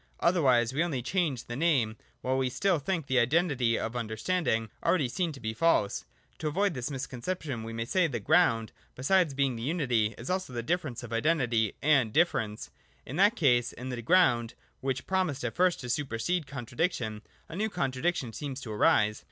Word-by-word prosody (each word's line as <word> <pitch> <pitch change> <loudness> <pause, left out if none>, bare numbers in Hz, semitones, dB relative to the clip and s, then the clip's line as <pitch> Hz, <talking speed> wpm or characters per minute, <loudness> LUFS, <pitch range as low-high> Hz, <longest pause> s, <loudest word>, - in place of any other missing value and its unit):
Otherwise 130 -9 +3
we 155 +5 +2
only 140 -8 -2
change 150 - -1
the 120 - -6
name, 135 -8 +2 0.3
while 130 +1 0
we 130 -1 +1
still 190 +5 +1
think 165 +2 -2
the 130 -2 +2
identity 130 -3 +2
(of 115 +2 -4
understanding) 115 - -1
already 170 -5 +2
seen 170 +7 -1
to 140 - -10
be 110 -2 -3
false. 115 -7 +1 0.3
To 155 - -2
avoid 195 +5 +1
this 125 0 -4
misconception 135 0 -4
we 115 - -6
may 115 0 -3
say 180 +7 +2
that - - -8
the 120 - -2
ground, 115 +2 +3 0.2
besides 160 +2 +2
being 135 -2 +1
the 115 - -6
unity, 125 -7 0
is 120 - -8
also 185 -7 -2
the 120 -1 -3
difference 150 -5 -2
of 115 -1 -7
identity 120 -5 +1
and 140 -7 +4
difference. 110 -9 0 0.3
In 140 - -6
that 205 +5 +5
case 120 - +2
in 125 +2 -7
the 125 -2 -4
ground, 120 -6 +3 0.2
which 130 -1 -2
promised 185 -9 -1
at 115 - -2
first 180 -1 +2
to 125 - -6
supersede 145 +5 -1
contradiction, 125 - -3 0.3
a 165 - -8
new 215 +4 0
contradiction 135 - -1
seems 135 +3 -5
to 115 - -7
arise. 105 0 +3
130 Hz, 185 wpm, -29 LUFS, 120-170 Hz, 0.3 s, that